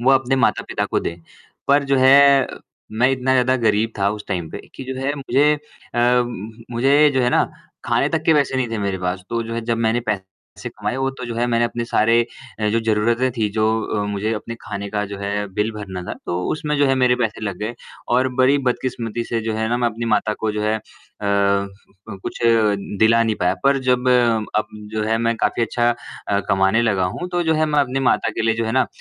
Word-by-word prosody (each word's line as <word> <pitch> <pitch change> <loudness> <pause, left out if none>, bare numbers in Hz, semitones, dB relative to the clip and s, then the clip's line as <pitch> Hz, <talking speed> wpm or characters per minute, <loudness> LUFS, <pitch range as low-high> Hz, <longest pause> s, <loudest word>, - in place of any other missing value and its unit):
वो 125 +3 +3
अपने 135 0 +2
माता - - +2
पिता - - -1
को - - +1
दे। 85 - -4 0.5
पर 140 0 +4
जो - - +5
है, 135 0 +6 0.5
मैं 125 +4 +3
इतना 130 0 0
ज़्यादा 130 0 +3
गरीब 110 +1 +2
था 100 0 +2
उस 105 -1 -6
टाइम 90 -4 -2
पे - - -7
की 130 - -8
जो - - -6
है 140 +2 -1
मुझे 140 +2 +2
अ, 125 -4 0 0.5
मुझे 135 +5 +4
जो 130 - +2
है 125 - +2
ना - - +3 0.4
खाने - - +1
तक - - -1
के 160 - +5
पैसे 140 -3 +1
नहीं 130 -2 0
थे 115 - -2
मेरे 100 -2 -2
पास। 90 0 -3
तो 115 0 -1
जो 115 0 -6
है 115 - -2
जब 115 0 0
मैंने 115 +1 +1
पैसे 95 -2 -7
कमाए, 105 +3 -4
वो 135 0 0
तो 130 -1 -8
जो 115 - -5
है 120 +1 0
मैंने 120 -1 +2
अपने 120 0 -3
सारे 115 +1 +2 0.4
जो 115 +2 +1
ज़रूरतें 115 +3 +1
थी 110 -2 +1
जो 110 -1 0
मुझे 105 +2 -2
अपने 115 +2 -6
खाने 100 0 -5
का 105 -1 -1
जो 100 0 -7
है, 100 +1 -2
बिल 105 +3 0
भरना 95 -4 -6
था, - - -5
तो 90 +1 -2
उसमे 150 -1 -2
जो 145 0 +3
है 135 - +3
मेरे 125 -1 +3
पैसे 115 -3 -2
लग 100 -3 -3
गए 105 +3 -4 0.4
और 130 +1 +2
बड़ी 130 +3 +4
बदकिस्मती 120 -2 -3
से 115 -1 -2
जो 110 0 -3
है 110 0 -1
ना, 120 - +1
मैं 120 -1 +1
अपनी 115 +1 -5
माता 105 -1 +1
को 110 - 0
जो 105 0 -2
है 110 +1 +1
अ, - - -8 0.5
क 100 0 +2 0.5
कुछ - - -5 0.6
दिला 115 +2 +5
नहीं 110 -1 0
पाया। 90 +1 +2
पर 140 0 +4
जब 125 -1 +1 0.5
अब 110 - -1 0.3
जो 110 -1 -1
है 110 +1 +1
मैं 115 0 +1
काफ़ी 115 - 0
अच्छा 120 +1 +1 0.4
अ, 100 0 +2
कमाने 95 +4 +3
लगा 100 -5 +1
हूँ, 175 - -4
तो 175 0 +1
जो 160 -1 +1
है 155 0 +2
मैं 150 -1 +1
अपनी 135 0 -1
माता 125 -3 +2
के - - -3
लिए 115 0 +2
जो 115 0 -1
है 110 - -2
ना, - - +3
115 Hz, 230 wpm, -20 LUFS, 105-130 Hz, 0.6 s, है